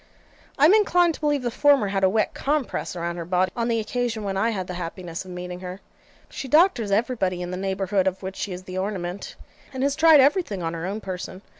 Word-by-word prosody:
I 285 - +5
am 340 - +7
inclined 355 -5 +4
to - - -10
believe 295 -3 0
the 240 - -1
former 280 -5 +3
had 195 -1 -1
a 190 - +5
wet 215 +2 0
COMPRESSE 290 -9 -2
around 170 0 -3
her 170 - -4
body, 180 +1 +1
on 235 -1 -1
the 230 -1 +1
occasion 225 0 -2
when 195 -1 -2
I 205 +4 +1
had 195 -5 -3
the 180 - -6
happiness 175 0 -6
of - - -11
meeting 180 0 -6
her. 185 +1 -7 0.5
She 270 - -7
doctors 300 - +4
everybody 200 -4 0
in 175 - -5
the - - -3
neighbourhood 190 0 0
of 190 +1 -2
which 190 0 -5
she 200 - -4
is 180 0 -6
the 185 0 -5
ornament; 190 -1 -4 0.4
and 265 0 -3
has 280 0 +1
tried 315 -1 +7
everything 270 - +2
on 165 0 -2
her 165 +1 -4
own 205 +3 -4
person. 185 0 -6
195 Hz, 235 wpm, -24 LUFS, 185-255 Hz, 0.5 s, am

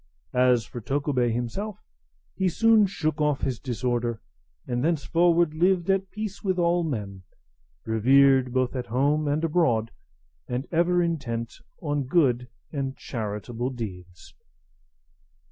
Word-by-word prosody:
As 125 -2 +3
for 120 - -8
Tokubei 135 -1 0
himself, 125 - -3 0.6
he 190 -1 +1
soon 220 +3 +4
shook 155 -5 -2
off 150 -2 +1
his 130 -4 -2
disorder, 120 -2 -2 0.5
and 120 +1 -2
thenceforward 170 +1 +2
lived 180 +2 +2
at 195 0 0
peace 215 -1 -6
with 190 -2 0
all 175 0 +2
men, 105 - -4 0.6
revered 130 +3 +4
both 130 0 0
at 125 -4 -3
home 145 +6 +1
and 145 +3 0
abroad, 150 -10 +1 0.6
and 125 +3 -3
ever 175 +1 +3
intent 120 -9 -3 0.3
on 145 -3 -1
good 125 -6 +2 0.2
and 135 -3 -3
charitable 115 +2 -4
deeds. 90 -8 -8
140 Hz, 125 wpm, -26 LUFS, 120-170 Hz, 0.6 s, soon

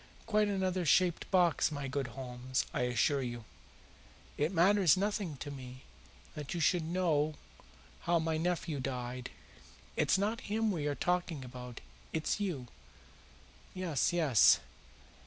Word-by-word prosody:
Quite 215 -1 +2
another 190 -2 0
shaped 175 +2 +2
box, 175 -4 +3
my 145 -2 -4
good 135 0 -2
Holmes, 125 0 -2
I - - -1
assure 130 +4 +2
you. 120 -3 -5 0.9
It 150 +4 0
matters 185 -1 +5
nothing 200 -6 -1
to 145 - -6
me 130 -2 -9 0.5
that 150 +2 -5
you - - -2
should 165 +2 +3
know 160 -3 +1 0.6
how 170 0 +1
my 160 -1 0
nephew 165 -3 -1
died. 125 -1 -4 0.7
It's - - +3
not 210 +4 -1
him 220 +1 +1
we 155 -6 -2
are 145 - -1
talking 175 -6 -1
about. 125 -1 -9 0.3
It's 160 +5 -1
you." 175 -11 -2 1.1
"Yes, 180 -6 0
yes." 155 - +5
160 Hz, 135 wpm, -33 LUFS, 130-185 Hz, 1.1 s, matters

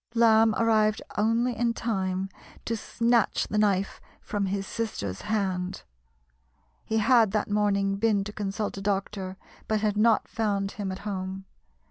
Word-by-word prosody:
Lamb 225 -1 +5
arrived 215 -2 +2
only 230 +3 +1
in 235 0 0
time 190 -4 -1 0.4
to 230 - -1
snatch 230 +1 +1
the 210 - 0
knife 200 -2 +1 0.2
from 205 -2 -2
his 195 +1 -2
sister's 145 - -4
hand. 190 -3 -2 1.0
He 220 - -1
had 225 0 +5
that 210 -1 0
morning 200 -1 +1
been 205 -1 +2
to 210 +1 -7
consult 205 0 -3
a - - -7
doctor, 195 -1 -2 0.3
but 215 -1 0
had 210 -1 0
not 220 +1 +3
found 200 -3 -1
him 195 -2 -4
at 190 - -5
home. 190 -1 -4
210 Hz, 145 wpm, -27 LUFS, 195-220 Hz, 1.0 s, Lamb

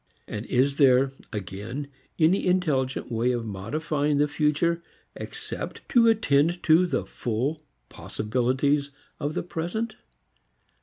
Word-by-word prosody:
And 105 +1 -5
is 135 +2 +2
there, 135 -1 +5 0.2
again, 105 +7 -5 0.3
any 175 +4 +3
intelligent 150 -11 0
way 115 +2 +1
of 120 -2 -2
modifying 145 +9 -1
the 145 +1 +3
future 150 +3 +1 0.3
except - - -6
to 235 -3 +5
attend 175 -6 +3
to 170 +3 +5
the - - -1
full 125 +6 -2 0.3
possibilities 130 +6 0 0.3
of 150 0 -2
the - - -1
present? 180 +7 -3
145 Hz, 115 wpm, -26 LUFS, 125-165 Hz, 0.3 s, there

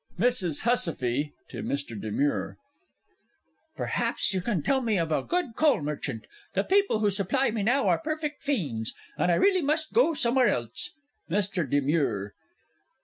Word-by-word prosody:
MRS. 195 -8 +1
HUSSIFFE 150 - +1 0.2
(to - - -6
MR. 140 -7 -4
DE 110 - -4
MURE). 145 +7 -1 1.2
Perhaps - - -1
you 190 - 0
can 180 -6 -1
tell 270 -1 +2
me 225 -5 +1
of 165 -2 -1
a - - +2
good 350 -10 -2
coal 305 -2 +4
merchant? 145 -5 -4 0.3
The - - +2
people 390 - +2
who 205 -1 +3
supply 215 +7 +1
me 220 -1 -2
now 245 +7 +2
are - - +3
perfect 310 -2 -3
fiends, 145 - -2 0.2
and 180 - +2
I - - +4
really 380 - +4
must 310 +1 0
go 430 -9 +4
somewhere 250 -1 +4
else. 120 - -2 0.3
MR. 185 -4 0
DE 145 +2 +2
MURE. 135 -9 0
200 Hz, 160 wpm, -27 LUFS, -, 1.2 s, coal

